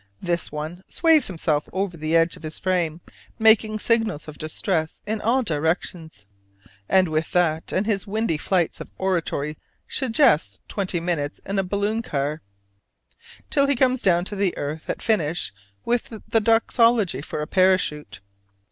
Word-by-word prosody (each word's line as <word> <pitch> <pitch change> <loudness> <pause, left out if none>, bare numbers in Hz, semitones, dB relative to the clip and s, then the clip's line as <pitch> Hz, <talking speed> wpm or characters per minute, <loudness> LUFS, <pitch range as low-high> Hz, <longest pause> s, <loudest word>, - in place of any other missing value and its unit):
This 175 -1 -1
one 155 +4 -5
sways 320 -5 +4
himself 160 -5 -1
over 190 -1 -2
the 155 +1 -1
edge 165 +1 +3
of - - -15
his 155 -1 -5
frame, 175 -3 -1 0.4
making 220 -1 +4
signals 220 -8 0
of 150 -1 -10
distress 160 +1 -2
in 215 0 -2
all 255 +4 +2
directions, 160 - -2 0.6
and 185 -1 +4
with 155 0 -2
that 165 -3 +1
and 190 - 0
his 205 -2 -1
windy 205 -6 -1
flights 175 -2 0
of - - -9
oratory 165 -5 -1 0.3
suggests 225 - +2
twenty 190 -3 -2
minutes 165 -4 -2
in 195 0 -1
a - - +1
balloon 205 +4 -1
car, 145 -5 -2 1.1
till 280 -1 +4
he 280 - +2
comes 255 0 +2
down 175 -2 +3
to 200 -2 -1
earth 150 +2 -5
at - - -1
the - - -13
finish 170 - 0 0.3
with 240 0 0 0.2
the 225 - +3
Doxology 225 - +3
for 150 0 -4
a - - -3
parachute. 165 - +1
180 Hz, 155 wpm, -23 LUFS, 155-215 Hz, 1.1 s, sways